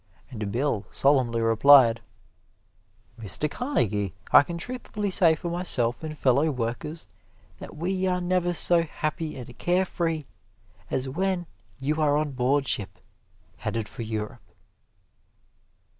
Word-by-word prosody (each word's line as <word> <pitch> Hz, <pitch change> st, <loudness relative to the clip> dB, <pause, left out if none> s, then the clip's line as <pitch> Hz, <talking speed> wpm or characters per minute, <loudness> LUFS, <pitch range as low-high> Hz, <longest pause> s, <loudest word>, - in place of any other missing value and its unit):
And 105 Hz, -4 st, -5 dB
Bill 120 Hz, -3 st, -1 dB
solemnly 125 Hz, -5 st, +2 dB
replied, 115 Hz, +1 st, +6 dB, 1.2 s
"Mr. 110 Hz, -, -1 dB
Carnegie, 105 Hz, -, -1 dB, 0.2 s
I -, -, +9 dB
can 170 Hz, +4 st, -5 dB
truthfully 210 Hz, -1 st, -4 dB
say 170 Hz, -4 st, +5 dB
for 170 Hz, +2 st, -5 dB
myself 140 Hz, -9 st, -1 dB
and 155 Hz, -1 st, -6 dB
fellow 140 Hz, +4 st, +2 dB
workers, 130 Hz, +5 st, -4 dB, 0.5 s
that -, -, -10 dB
we 185 Hz, +3 st, -1 dB
are 180 Hz, 0 st, 0 dB
never 180 Hz, 0 st, 0 dB
so 175 Hz, 0 st, +4 dB
happy 155 Hz, -1 st, -4 dB
and 125 Hz, -1 st, -9 dB
care 180 Hz, +2 st, +1 dB
free 165 Hz, -4 st, -2 dB, 0.6 s
as 130 Hz, 0 st, -1 dB
when 180 Hz, +5 st, -1 dB, 0.3 s
you 150 Hz, +3 st, -1 dB
are 145 Hz, -1 st, +3 dB
on 150 Hz, -1 st, -1 dB
board 135 Hz, +2 st, +1 dB
ship, 95 Hz, -4 st, -2 dB, 0.6 s
headed 115 Hz, -2 st, -3 dB
for -, -, -8 dB
Europe." 110 Hz, -1 st, -5 dB
145 Hz, 130 wpm, -26 LUFS, 120-175 Hz, 1.2 s, I